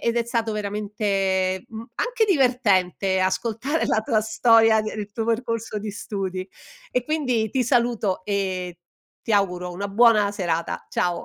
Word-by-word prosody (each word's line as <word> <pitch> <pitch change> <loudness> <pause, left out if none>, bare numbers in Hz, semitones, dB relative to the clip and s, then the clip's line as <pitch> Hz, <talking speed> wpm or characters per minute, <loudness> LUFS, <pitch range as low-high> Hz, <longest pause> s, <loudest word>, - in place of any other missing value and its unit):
ed 235 0 0
è 235 - +2
stato 230 -2 -1
veramente, 200 -3 -1
mhmm, 225 0 -8
anche 480 -2 +1
divertente 205 - +2
ascoltare 230 +10 0
la 220 - +1
tua 220 -2 +1
storia, 225 0 +4
il 215 -1 -4
tuo 225 0 -3
percorso 230 -2 -2
di 210 0 -5
studi. 190 -2 -5 0.4
E 250 -1 0
quindi 255 -8 0
ti 260 +2 +1
saluto 235 -6 0
e 185 -3 -2 0.4
ti 225 - -3
auguro 180 -3 0
una 200 +3 -4
buona 215 -1 +4
serata, 170 -4 -2
ciao. 175 -1 -1
215 Hz, 145 wpm, -23 LUFS, 190-230 Hz, 0.4 s, storia